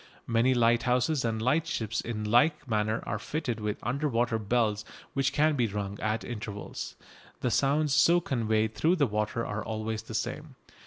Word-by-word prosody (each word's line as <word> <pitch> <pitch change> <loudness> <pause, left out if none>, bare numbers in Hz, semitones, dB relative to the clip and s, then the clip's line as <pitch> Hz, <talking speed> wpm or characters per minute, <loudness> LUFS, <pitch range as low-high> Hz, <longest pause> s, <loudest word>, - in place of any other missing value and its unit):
Many 120 +3 +2
lighthouses 125 +4 +2
and 115 -2 -1
lightships 120 -3 0
in 110 -2 -4
like 140 +8 +3
manner 110 -1 0
are - - -2
fitted 130 -7 -3
with 105 -1 -2
under 140 +6 -1
water 115 -2 +1
bells 110 -1 +1 0.3
which 135 0 +1
can 150 +1 +3
be 120 -4 +2
rung 100 -1 -4
at 110 +1 -1
intervals. 105 -3 -6 0.5
The 125 - 0
sounds 140 +4 +2
so 170 +3 +5
conveyed 110 -7 0
through 165 +9 +2
the 150 -5 +3
water 105 +1 -1
are 105 0 -3
always 110 -1 -3
the - - -8
same. - - -4
115 Hz, 165 wpm, -29 LUFS, 110-135 Hz, 0.5 s, so